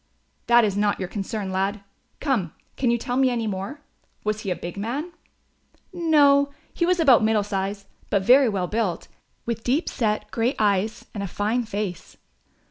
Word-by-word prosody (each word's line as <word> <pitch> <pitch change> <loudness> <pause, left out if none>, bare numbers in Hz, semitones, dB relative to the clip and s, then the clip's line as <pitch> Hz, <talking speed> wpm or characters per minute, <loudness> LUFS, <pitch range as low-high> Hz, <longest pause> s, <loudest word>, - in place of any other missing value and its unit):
"That 240 -1 +6
is 200 -2 -1
not 205 0 +1
your 185 - -3
concern, 200 0 -4
lad; 195 +2 -1 0.4
come, 235 - -1 0.2
can 255 - +1
you 235 - +3
tell 245 +2 -3
me 265 -1 +4
any 235 -2 -1
more? 210 +8 -4 0.4
Was 215 0 -1
he 195 - -4
a 180 - 0
big 175 - -7
man?" 250 - -3 0.8
"No, 290 -5 +4 0.2
he 340 - 0
was 365 0 +2
about 265 -9 +6
middle 215 -1 +2
size; 200 0 -3 0.2
but 200 -2 +1
very 255 +4 +6
well 195 -4 -1
built, 210 -3 -2 0.4
with 230 -1 -3
deep 275 +7 +1
set 215 -3 -1
grey 235 +3 0
eyes 210 +1 0
and 205 - -4
a 200 - -2
fine 215 +6 -1
face." 205 -5 -5
215 Hz, 175 wpm, -24 LUFS, 200-250 Hz, 0.8 s, That